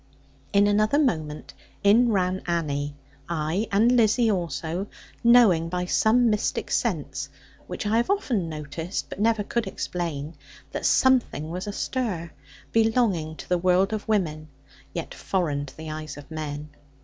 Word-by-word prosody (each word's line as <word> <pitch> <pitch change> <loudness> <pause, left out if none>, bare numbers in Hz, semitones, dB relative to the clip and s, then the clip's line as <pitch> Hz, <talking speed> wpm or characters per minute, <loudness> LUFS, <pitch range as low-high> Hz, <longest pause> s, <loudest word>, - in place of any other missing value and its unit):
In 200 0 +5
another 215 +6 +3
moment 155 - -1 0.3
in 230 +4 +5
ran 185 -2 +1
Annie, 145 -4 -1 0.3
ay 170 +6 -1
and 215 +5 +4
Lizzie 230 -1 +4
also, 170 +1 -2 0.4
knowing 225 -9 +6
by 180 +1 -2
some 230 +6 +3
mystic 210 0 -1
sense - - -1 0.4
(which - - -5
I 215 +2 +2
have 235 - +1
often 245 - 0
noticed, 155 +4 -5
but - - -8
never 220 0 +2
could 235 +3 -2
explain) 165 -4 -4 0.4
that - - -1
something 240 - +2
was 180 +3 -4
astir, 205 -5 -3 0.4
belonging 220 -9 +2
to - - -10
the 180 -1 +1
world 185 +3 +3
of 215 - -4
women, 160 -8 0 0.4
yet 170 - -5
foreign 150 -7 -1
to - - -13
the 160 0 -6
eyes 155 -2 -6
of 145 +2 -12
men. 150 -1 -5
180 Hz, 145 wpm, -25 LUFS, 155-220 Hz, 0.4 s, knowing